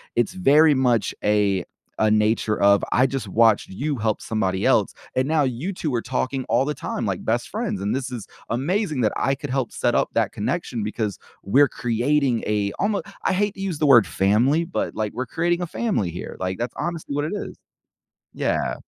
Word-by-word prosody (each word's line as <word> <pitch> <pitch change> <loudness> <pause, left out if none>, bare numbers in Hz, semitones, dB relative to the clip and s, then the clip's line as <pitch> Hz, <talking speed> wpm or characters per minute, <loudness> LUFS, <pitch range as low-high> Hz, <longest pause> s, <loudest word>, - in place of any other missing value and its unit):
it's 120 -1 +1
very 155 -3 +5
much 125 -5 +1
a 100 -3 +2 0.4
a 110 - +3
nature 110 0 +2
of 100 0 +5
I 130 +2 +4
just 130 -5 -4
watched 110 +1 +3
you 140 +9 -3
help 110 -1 -1
somebody 95 -4 -1
else, - - +3 0.2
and 130 +1 +2
now 155 -1 +2
you 135 +9 -2
2 155 -6 -3
are 115 - 0
talking 130 +1 -2
all 120 +3 +2
the 150 - -1
time - - -4
like - - -3
best - - 0
friends. 95 - -3
And 100 +1 -1
this 130 -1 -3
is 120 -5 -6 0.2
amazing 155 - 0
that 110 -3 +2
I 135 +2 +1
could 140 +1 -7
help 130 -2 -1
set - - 0
up - - +2
that - - +1
connection 120 -3 -3
because 105 -1 -3 0.3
we're 135 +9 +4
creating 125 +1 0
a 105 -1 0
almo 205 +1 +1 0.2
I - - +2
hate 205 +2 0
to 195 - -8
use 185 -6 -3
the 155 - +2
word 120 -7 +7
"family," 120 - +2
but, 175 - -3
like, 110 -1 -2
we're 125 +3 -3
creating 175 +3 0
a 175 - -2
family 185 - -1
here. 85 - -7
Like, 95 0 -2
that's 120 0 -4
honestly 170 -4 -4
what 145 +1 0
it 155 - -3
is. - - -6 0.8
Yeah. - - -1
125 Hz, 205 wpm, -23 LUFS, 110-150 Hz, 0.8 s, word